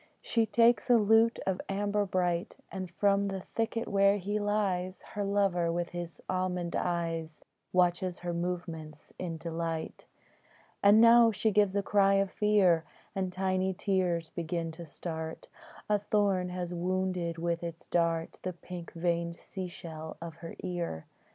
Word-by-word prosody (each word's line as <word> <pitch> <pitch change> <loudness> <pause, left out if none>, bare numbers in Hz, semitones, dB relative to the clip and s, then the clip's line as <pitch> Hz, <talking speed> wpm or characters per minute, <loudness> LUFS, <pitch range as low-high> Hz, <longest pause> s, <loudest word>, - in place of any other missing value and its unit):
She 230 -2 +1
takes 230 +2 +4
a 240 - +7
lute 225 +2 +4
of 190 -1 0
amber 205 +1 0
bright, 180 0 -1
And 185 -2 -5
from 200 +2 +2
the 195 -1 -3
thicket 230 0 -1
where 200 0 +4
he 205 +2 -2
lies 195 -3 -1
Her 205 - -1
lover, 195 -4 +1
with 175 0 -2
his 175 -1 -6
almond 180 -2 -1
eyes, 165 -2 -2 0.3
Watches 180 0 +2
her 175 -1 -2
movements 170 -3 -5
in 170 -3 -3
delight. 165 0 -4 0.8
And 205 +2 +7
now 230 0 +8
she 220 +1 +1
gives 205 -1 +3
a 200 - +1
cry 195 -1 +4
of 195 -1 +1
fear, 195 -6 +3 0.3
And 190 -2 -2
tiny 185 0 0
tears 180 -4 0
begin 165 -1 -3
to 165 +1 -10
start: 160 +1 -6 0.4
A 210 -1 +2
thorn 200 -3 +1
has 180 -1 -4
wounded 180 -1 -1
with 170 0 -1
its 170 -1 -6
dart 165 -1 0
The 185 - -3
pink 175 0 -9
veined 170 0 -1
sea 190 -2 -6
shell 160 -2 -8
of 165 -1 -8
her 165 0 -8
ear. 170 - -3
180 Hz, 150 wpm, -30 LUFS, 170-200 Hz, 0.8 s, now